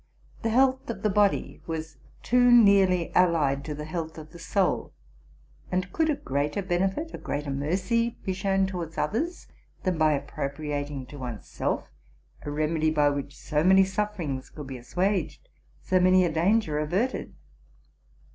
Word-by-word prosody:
The 225 Hz, -, 0 dB
health 260 Hz, +2 st, +2 dB
of 230 Hz, -, -5 dB
the 210 Hz, -, +2 dB
body 205 Hz, 0 st, +1 dB
was 160 Hz, -3 st, -5 dB, 0.3 s
too 245 Hz, 0 st, +4 dB
nearly 195 Hz, -6 st, +5 dB
allied 155 Hz, -6 st, +3 dB
to 150 Hz, -, -4 dB
the 150 Hz, +1 st, -6 dB
health 160 Hz, 0 st, -5 dB
of 155 Hz, 0 st, -10 dB
the 170 Hz, -, -12 dB
soul; 185 Hz, +3 st, 0 dB, 0.8 s
and 185 Hz, +1 st, -1 dB
could 320 Hz, -1 st, +1 dB
a 300 Hz, -, +2 dB
greater 145 Hz, -, -2 dB
benefit, 190 Hz, -, -1 dB
a -, -, -6 dB
greater 145 Hz, 0 st, -3 dB
mercy, 185 Hz, -, 0 dB
be 190 Hz, -, 0 dB
shown 195 Hz, +1 st, +1 dB
towards 175 Hz, -4 st, -5 dB
others 310 Hz, -, -2 dB, 0.4 s
than 185 Hz, -4 st, 0 dB
by 155 Hz, -1 st, +4 dB
appropriating 145 Hz, -1 st, -4 dB
to 145 Hz, +2 st, -11 dB
one's 120 Hz, -4 st, -6 dB
self -, -, -3 dB, 0.5 s
a -, -, -6 dB
remedy 155 Hz, +1 st, 0 dB
by 150 Hz, -2 st, +3 dB
which 140 Hz, 0 st, -5 dB
so 150 Hz, 0 st, -1 dB
many 190 Hz, +2 st, +6 dB
sufferings 190 Hz, -9 st, -3 dB
could 150 Hz, -, -9 dB
be 130 Hz, -1 st, -7 dB
assuaged, 190 Hz, -, -2 dB, 0.4 s
so 185 Hz, -, +2 dB
Many 185 Hz, 0 st, +5 dB
a 170 Hz, -, 0 dB
danger 165 Hz, -1 st, +2 dB
averted? 190 Hz, -, -1 dB
175 Hz, 155 wpm, -27 LUFS, 150-200 Hz, 0.8 s, many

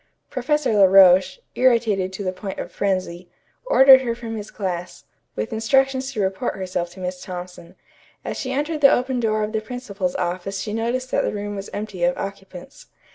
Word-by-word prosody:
Professor 285 Hz, 0 st, 0 dB
La 200 Hz, -2 st, +6 dB
Roche, 190 Hz, -, +6 dB, 0.2 s
irritated 225 Hz, -7 st, +2 dB
to 195 Hz, +2 st, -6 dB
the 185 Hz, -, -1 dB
point 190 Hz, +1 st, -7 dB
of -, -, -6 dB
frenzy, 185 Hz, -3 st, -2 dB, 0.4 s
ordered 265 Hz, -, +8 dB
her 235 Hz, -3 st, -2 dB
from 230 Hz, -1 st, -6 dB
his 210 Hz, -1 st, -7 dB
class, 180 Hz, -3 st, -5 dB, 0.3 s
with 105 Hz, +1 st, -4 dB
instructions 265 Hz, +4 st, +1 dB
to 240 Hz, -, -6 dB
report 190 Hz, +4 st, -1 dB
herself 185 Hz, -2 st, -3 dB
to 175 Hz, +2 st, -14 dB
Miss 180 Hz, 0 st, -5 dB
Thompson. 180 Hz, -2 st, -9 dB, 0.5 s
As -, -, -3 dB
she 260 Hz, -2 st, -4 dB
entered 295 Hz, +3 st, -2 dB
the 275 Hz, -, +7 dB
open 255 Hz, 0 st, 0 dB
door 215 Hz, -2 st, 0 dB
of 210 Hz, -, -3 dB
the 220 Hz, -1 st, -2 dB
principal's 210 Hz, -6 st, -4 dB
office 185 Hz, +2 st, -3 dB
she 210 Hz, -, -5 dB
noticed 240 Hz, +3 st, -2 dB
that -, -, +1 dB
the -, -, -1 dB
room 205 Hz, 0 st, -5 dB
was 195 Hz, 0 st, -7 dB
empty 205 Hz, -4 st, -5 dB
of 175 Hz, 0 st, +2 dB
occupants. 195 Hz, +3 st, -9 dB
205 Hz, 185 wpm, -22 LUFS, 185-245 Hz, 0.5 s, ordered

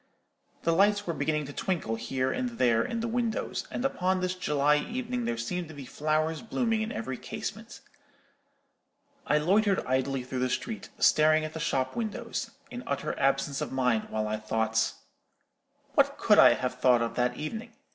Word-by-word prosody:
The 165 Hz, -, +2 dB
lights 205 Hz, +3 st, +3 dB
were 170 Hz, -, -1 dB
beginning 150 Hz, -2 st, -1 dB
to 145 Hz, -, -8 dB
twinkle 170 Hz, -, -2 dB
here 130 Hz, +3 st, -1 dB
and 250 Hz, -2 st, -3 dB
there 115 Hz, -2 st, +3 dB
in 230 Hz, -, -3 dB
the 230 Hz, -, -1 dB
windows; 230 Hz, -1 st, -2 dB
and 245 Hz, -, -3 dB
upon 185 Hz, -7 st, +1 dB
this 185 Hz, 0 st, -1 dB
July 150 Hz, -4 st, +2 dB
evening 245 Hz, +6 st, -3 dB
there 115 Hz, -, -1 dB
seemed 170 Hz, +9 st, -3 dB
to 160 Hz, -, -11 dB
be 140 Hz, -2 st, -8 dB
flowers 155 Hz, +3 st, -1 dB
blooming 225 Hz, -1 st, 0 dB
in 220 Hz, -, -2 dB
every 130 Hz, +3 st, -4 dB
casement. -, -, -7 dB, 1.5 s
I 150 Hz, -, +4 dB
loitered 195 Hz, +5 st, +2 dB
idly 130 Hz, 0 st, 0 dB
through 130 Hz, 0 st, -4 dB
the 130 Hz, 0 st, +1 dB
street, 220 Hz, -, -4 dB
staring 155 Hz, 0 st, +4 dB
at 155 Hz, -, -6 dB
the 160 Hz, -, -5 dB
shop 130 Hz, -5 st, -1 dB
windows, 230 Hz, 0 st, -3 dB, 0.2 s
in 245 Hz, -, -5 dB
utter 140 Hz, -, -2 dB
absence 140 Hz, 0 st, +1 dB
of -, -, -3 dB
mind 125 Hz, -4 st, +1 dB
while 110 Hz, 0 st, -1 dB
I 110 Hz, 0 st, -1 dB
thought— 110 Hz, +1 st, 0 dB, 1.0 s
"What -, -, +3 dB
could -, -, +5 dB
I -, -, +8 dB
have 125 Hz, 0 st, -3 dB
thought 125 Hz, -2 st, +4 dB
of 115 Hz, -, -3 dB
that 125 Hz, 0 st, 0 dB
evening? 225 Hz, +9 st, -5 dB
155 Hz, 175 wpm, -29 LUFS, 130-205 Hz, 1.5 s, I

